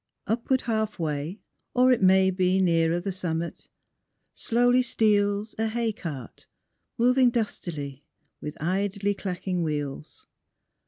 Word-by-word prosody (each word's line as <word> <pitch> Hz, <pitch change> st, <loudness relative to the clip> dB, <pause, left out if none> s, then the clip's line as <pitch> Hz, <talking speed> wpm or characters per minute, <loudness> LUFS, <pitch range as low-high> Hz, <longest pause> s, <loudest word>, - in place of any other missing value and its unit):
Upward 235 Hz, +4 st, 0 dB
half 220 Hz, -2 st, -1 dB
way, 155 Hz, +4 st, -3 dB, 0.3 s
or 255 Hz, +1 st, +5 dB
it 245 Hz, -, +3 dB
may 190 Hz, 0 st, +5 dB
be 185 Hz, 0 st, +2 dB
Nearer 165 Hz, -2 st, +2 dB
the 195 Hz, +2 st, -3 dB
summit, 170 Hz, -2 st, -4 dB, 0.7 s
slowly 245 Hz, +2 st, +3 dB
steals 210 Hz, -3 st, +1 dB
A 225 Hz, -, +1 dB
hay 225 Hz, 0 st, -1 dB
cart, 145 Hz, -, -8 dB, 0.5 s
moving 250 Hz, +1 st, +4 dB
dustily 155 Hz, -, -4 dB, 0.4 s
With 150 Hz, 0 st, -6 dB
idly 200 Hz, +4 st, 0 dB
clacking 185 Hz, -2 st, -3 dB
wheels. 150 Hz, -2 st, -4 dB
190 Hz, 115 wpm, -26 LUFS, 165-225 Hz, 0.7 s, or